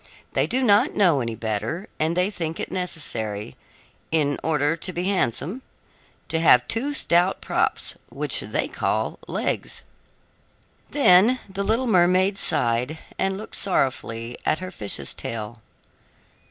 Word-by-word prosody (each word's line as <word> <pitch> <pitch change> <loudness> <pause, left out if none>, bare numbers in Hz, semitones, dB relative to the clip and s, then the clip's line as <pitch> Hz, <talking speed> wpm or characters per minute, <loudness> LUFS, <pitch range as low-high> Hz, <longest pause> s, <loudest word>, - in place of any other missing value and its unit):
They - - +2
do 260 +1 0
not 220 +5 +4
know 170 -9 +4
any 115 -1 -3
better, 110 - -3
and 160 +3 +1
they 180 +3 +2
think 165 -4 -4
it - - -4
necessary, 110 - -3 0.6
in 145 -3 +1
order 150 -1 +1
to 185 - -3
be 175 0 -3
handsome, 185 - -1 0.7
to 160 - -1
have 125 -6 +5
two 255 +6 -1
stout 175 -2 +2
props, - - 0 0.2
which - - -1
they - - -2
call - - -2
legs." - - -3 1.1
Then 235 -1 +5
the 195 0 -5
little 225 +6 +1
mermaid 185 -1 +3
sighed 120 +6 +1 0.2
and 190 0 0
looked 215 - -3
sorrowfully 120 - 0
at 155 - +1
her 185 +1 -7
fish's 100 - -3
tail. 115 0 -6
170 Hz, 135 wpm, -24 LUFS, 125-195 Hz, 1.1 s, have